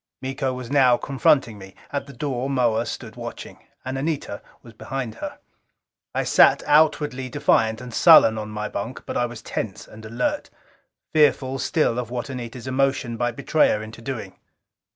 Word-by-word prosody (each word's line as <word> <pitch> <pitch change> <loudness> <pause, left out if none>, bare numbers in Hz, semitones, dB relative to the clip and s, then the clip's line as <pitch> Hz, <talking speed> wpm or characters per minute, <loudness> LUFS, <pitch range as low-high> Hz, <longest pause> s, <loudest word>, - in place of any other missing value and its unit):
Miko 135 0 -2
was 125 0 -7
now 130 -4 +5
confronting 135 -5 +1
me: 95 0 -12 0.2
at 140 -1 -3
the 140 - -11
door 130 0 -3
Moa 120 -4 +1
stood - - -7
watching. - - -8 0.3
And 130 +1 -3
Anita 145 -8 -3 0.2
was 115 - -14
behind 125 0 -5
her. - - -5 0.8
I - - +1
sat - - +5
outwardly 145 -4 +2
defiant 115 -5 +2
and 125 -2 -9
sullen 155 -9 +7
on 105 0 -6
my 105 0 -4
bunk. 110 +6 -6
But - - -5
I 120 - +1
was 115 -2 -10
tense 105 -4 -5
and 110 0 -13
alert, 200 - -2 0.6
fearful 140 -3 +3
still 125 -5 +1
of 125 - -4
what 125 +3 -4
Anita's 120 -1 -7
emotion 130 -2 0
might 120 0 -1
betray 150 +3 +2
her 105 - -1
into 110 +1 -10
doing. 115 -6 -6
125 Hz, 170 wpm, -23 LUFS, 115-140 Hz, 0.8 s, sullen